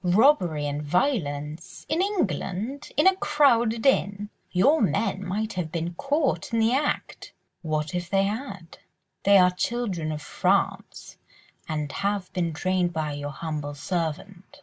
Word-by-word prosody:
"Robbery 180 - +3
and 145 0 -2
violence!—in 160 - -1
England!—in 285 - -1
a 380 0 +6
crowded 240 -8 +3
inn! 205 -6 +1 0.2
Your 275 - +3
men 195 +1 0
might 215 +4 -2
have 175 -4 -3
been 170 +1 -3
caught 280 - -1
in 230 - 0
the 225 +1 +3
act!" 290 +3 -2 0.3
"What 155 -1 -2
if 175 -1 -3
they 195 0 +3
had? 200 -4 -5 0.5
They 200 0 +7
are 180 -1 +6
children 180 -5 -2
of 150 -1 -5
France, - - -1 0.5
and 150 -2 -2
have 200 -1 -2
been 175 -3 0
trained 180 +2 0
by 155 -2 -2
your 145 0 -4
humble 150 0 -5
servant. 180 - -4
185 Hz, 135 wpm, -26 LUFS, 160-230 Hz, 0.5 s, They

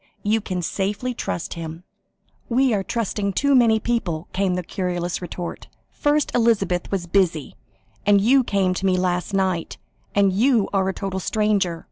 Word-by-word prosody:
You 220 +2 +1
can 185 -3 -3
safely 205 +8 -2
trust 175 - -4
him." 165 0 -7 0.7
"We 255 +1 +3
are 200 - +1
trusting 205 -2 -2
too 280 +7 +2
many 230 -4 +5
people," 190 -9 -2
came 190 -1 +1
the 180 - -2
querulous 180 -1 -3
retort. 175 -1 -6 0.2
"First 295 0 +1
Elizabeth 205 -7 +1
was 190 -3 -2
busy, 175 -4 +1 0.5
and 205 -1 +5
you 255 +6 +4
came 195 -5 +1
to 190 - -3
me 185 -1 +2
last 180 +1 -1
night, 185 -3 -1 0.4
and 200 -2 +4
you 230 +1 +3
are 190 -1 +2
a - - -2
total 195 -2 -3
stranger. 200 -4 0
195 Hz, 160 wpm, -22 LUFS, 180-220 Hz, 0.7 s, many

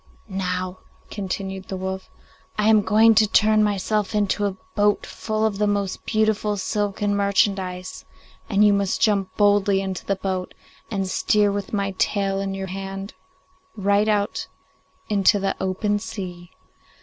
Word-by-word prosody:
'Now,' 185 -2 -3 0.3
continued 195 -1 -4
the 190 - -4
wolf, 190 0 -5 0.5
'I 210 +1 +3
am 215 -1 +6
going 220 +2 +5
to 215 0 +4
turn 215 0 +4
myself 210 +1 0
into 205 0 +1
a 190 -1 -5 0.2
boat 205 -1 +2
full 215 0 -2
of 205 -2 -1
the 210 - +2
most 200 -2 -2
beautiful 215 -1 +1
silken 205 +1 -1
merchandise, 195 -2 0 0.5
and 210 0 +4
you 205 - +5
must 200 -1 0
jump 200 -4 +1
boldly 205 -1 +4
into 190 -2 -4
the 195 - 0
boat, 190 -1 -4 0.3
and 195 -3 -2
steer 205 +2 +2
with 200 -1 -4
my 200 -2 -1
tail 195 -1 +1
in 195 0 -3
your 195 0 -4
hand 195 +1 -6 0.6
right 200 +1 +2
out 205 -1 0 0.6
into 205 0 +3
the 195 -1 -1
open 205 +2 0
sea. 180 -4 -7
200 Hz, 150 wpm, -23 LUFS, 190-210 Hz, 0.6 s, am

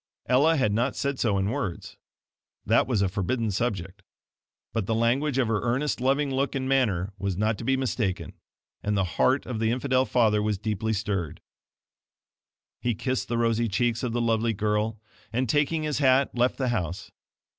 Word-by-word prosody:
Ella 145 +6 +4
had 130 -7 +2
not 120 +5 0
said 140 -1 -2
so 105 -4 +1
in 95 +2 0
words 90 -6 -4 0.7
THAT - - +3
was 115 -6 +1
a - - +2
forbidden 105 +4 -1
subject 95 -3 -3 0.7
but 110 -4 -1
the 115 - +1
language 125 +5 +1
of 130 -3 +2
her 110 -2 0
earnest 125 +3 -1
loving 135 +2 +1
look 135 +2 0
and 130 -1 -2
manner 105 -8 +1
was 100 -2 -2
not 110 +2 +1
to - - -6
be 135 +3 +1
mistaken; 100 -10 -2 0.5
and 105 0 -1
the 95 - +2
heart 130 +9 +1
of 120 -4 -4
the 110 0 +1
infidel 130 +2 +1
father 110 -4 +3
was 105 -1 0
deeply 110 +1 -2
stirred. 95 -6 -2 1.4
He 120 -2 -1
kissed 130 +4 -2
the 120 - -1
rosy 115 0 +1
cheeks 115 +3 0
of 125 - -2
the 120 +1 -1
lovely 115 0 +1
girl, 105 +1 -1 0.3
and 125 +3 0
taking 150 +5 +1
his 150 -2 -1
hat, 135 -1 +3
left 125 +1 +1
the 130 -2 0
house. 90 -7 -3
115 Hz, 180 wpm, -26 LUFS, 105-130 Hz, 1.4 s, Ella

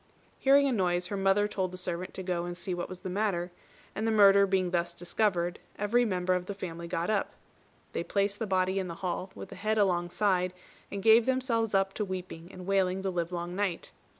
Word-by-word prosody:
Hearing 280 +1 +5
a - - +1
noise, 180 -5 +1
her 200 - -4
mother 195 +1 +3
told 190 -3 -2
the 185 - -7
servant 180 0 -4
to 190 - -4
go 180 -2 -1
and 175 0 -5
see 180 +1 -3
what 175 0 -4
was 185 -1 -7
the 190 - -5
matter; 185 -3 -1 0.4
and 220 +2 -2
the - - +2
murder 200 -2 +6
being 185 -2 +1
thus 175 -1 -1
discovered, 175 -1 0 0.2
every 235 +4 +2
member 185 -3 0
of 180 0 -2
the 200 - -4
family 170 -3 -6
got 170 +3 -1
up. 205 -2 0 0.6
They - - -1
placed 200 0 0
the 225 - -2
body 190 0 +1
in 190 - -3
the 170 - -6
hall, 180 +1 -2
with - - -8
the - - -9
head 215 +3 -1
alongside, 180 -1 +1 0.4
and 200 -1 -4
gave 225 +1 +6
themselves 235 -5 +1
up 195 0 +2
to 215 - -2
weeping 185 -3 -6
and 185 -1 -9
wailing 190 -1 +1
the 190 - 0
livelong 175 0 -3
night. 195 -4 -2
190 Hz, 215 wpm, -29 LUFS, 180-205 Hz, 0.6 s, murder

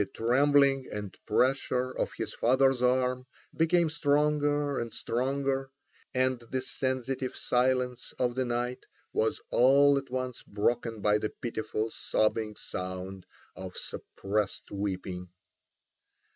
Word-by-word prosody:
The 100 - 0
trembling 135 +4 +3
and 105 -2 -5
pressure 130 +2 +2
of - - -2
his - - -4
father's 130 +1 +3
arm 125 0 +1 0.3
became 170 +1 +3
stronger 145 -1 +1
and 115 -1 -4
stronger, 135 +3 -1 0.4
and 130 -1 +1
the 125 +2 -4
sensitive 130 0 -2
silence 125 0 0
of 125 -1 +1
the 130 +1 0
night 120 +1 -2 0.3
was 110 - +1
all 140 +3 +6
at 135 - -12
once 130 -1 -3
broken 115 +1 -1
by 105 +1 +3
the 110 - -2
pitiful 110 -1 -3
sobbing 110 0 0
sound 95 0 -6 0.3
of 95 -1 -8
suppressed 100 0 -3
weeping. 95 -2 -4
125 Hz, 115 wpm, -29 LUFS, 110-135 Hz, 0.4 s, all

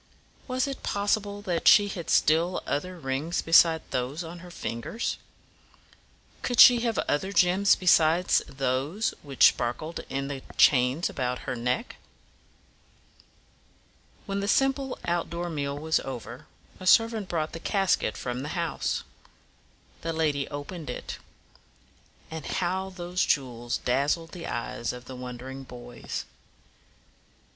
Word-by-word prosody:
Was 255 -1 0
it 275 -1 -5
possible 205 0 -1
that 175 -4 -1
she 205 -1 +8
had 180 -4 -6
still 165 +4 +3
other 180 +5 -3
rings 145 +3 -2
besides 165 0 +5
those 130 +7 -2
on 170 +1 -8
her 180 +1 -11
fingers? 170 - -4 1.2
Could 245 - -2
she 245 -2 +10
have 230 -1 -1
other 190 +7 0
gems 195 +1 +4
besides 175 -1 +4
those 135 - -1
which 140 -4 +5
sparkled 155 +8 -4
in 135 0 -2
the 140 -2 -5 0.2
chains 130 +4 +4
about 125 -1 -3
her 130 - -2
neck? 125 - -2 2.3
When 200 -1 -2
the 200 - -2
simple 270 +2 +1
out 175 0 -1
door 170 +1 -4
meal 140 -2 -3
was 160 +2 +1
over, 125 +2 -7 0.3
a 185 - -6
servant 225 -4 +4
brought 160 -2 -1
the 165 - -7
casket 195 - +1
from 125 0 -4
the 150 +6 -5
house. 170 -2 -1 1.0
The 165 0 -2
lady 150 -3 0
opened 145 +1 -7
it. 125 - -6 1.1
Ah, 160 0 -5
how 190 +4 -2
those 180 -1 -2
jewels 120 -3 -1
dazzled 145 +6 0
the 175 -2 -7
eyes 120 0 -3
of 125 0 -10
the 130 - -8
wondering 125 +2 -7
boys! 120 -1 -7
160 Hz, 130 wpm, -27 LUFS, 135-185 Hz, 2.3 s, she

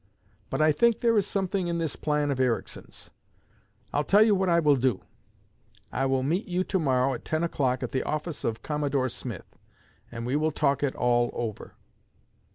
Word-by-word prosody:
But 155 - 0
I 155 - +5
think 235 +9 +2
there 230 -1 +3
is 205 -2 +2
something 190 -2 -1
in 170 0 -1
this 165 -3 -2
plan 150 -1 0
of 135 - -2
Ericsson's. 125 -3 -3 0.8
I'll 145 - +1
tell 205 +7 +5
you 220 -1 +4
what 190 -1 +1
I 170 0 +4
will 150 -3 +4
do. 125 -6 0 0.9
I 135 - 0
will 130 -1 +1
meet 170 +9 -1
you 180 0 0
to 190 0 -1
morrow 130 -3 +2
at 120 - -7
ten 160 +1 -1
o'clock, 130 -6 0
at - - -4
the 130 - 0
office 155 +1 -4
of 115 -1 -2
Commodore 145 -3 -1
Smith, 120 -5 -8 0.5
and 115 -1 -6
we 125 +3 -1
will 155 +1 +2
talk 140 -2 +1
it 145 -2 0
all 120 -1 +2
over.' 110 -3 -5
145 Hz, 190 wpm, -27 LUFS, 130-170 Hz, 0.9 s, I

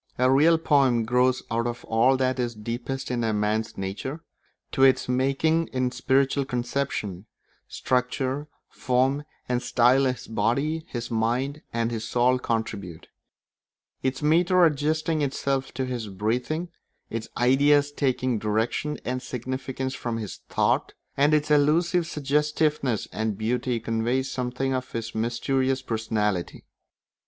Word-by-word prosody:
A 130 +1 +3
real 155 +5 +5
poem 135 -7 +3
grows 125 +2 +2
out 115 +1 0
of 120 0 -5
all 120 +4 +3
that 130 0 0
is 120 -2 -1
deepest 120 +5 -4
in 120 -1 -1
a 110 - +1
man's 105 +1 -1
nature; 105 +11 -5 0.5
to 135 - -1
its 135 -1 +5
making 140 +6 +1
in 130 -1 -1
spiritual 135 +2 +1
conception, 120 -6 -3 0.4
structure, 130 +3 -1 0.2
form, 130 +3 0 0.2
and 125 -1 0
style 125 +3 +3
his 130 -1 -2
body, 135 +9 0
his 120 -1 -5
mind, 125 +6 0
and 115 0 -1
his 115 -1 -3
soul 125 +2 +2
contribute; 105 -8 -4 0.9
its 130 +1 -2
metre 175 +4 +4
adjusting 155 +1 +1
itself 135 -1 -1
to 130 +1 -1
his 125 -4 -4
breathing, 125 - -2 0.4
its 115 0 -4
ideas 145 +3 +4
taking 130 -4 0
direction 110 +8 -1
and 130 +1 -2
significance 130 +1 -4
from 120 -3 -3
his 110 -3 -6
thought, - - +1 0.2
and 145 +2 +3
its 150 0 +2
elusive 165 +4 +3
suggestiveness 150 -4 0
and 110 -2 -2
beauty 120 +2 -1
conveying 115 +3 0
something 130 0 -2
of 130 0 -4
his 115 -1 -4
mysterious 130 +4 0
personality. 110 -6 -2
130 Hz, 130 wpm, -25 LUFS, 115-140 Hz, 0.9 s, real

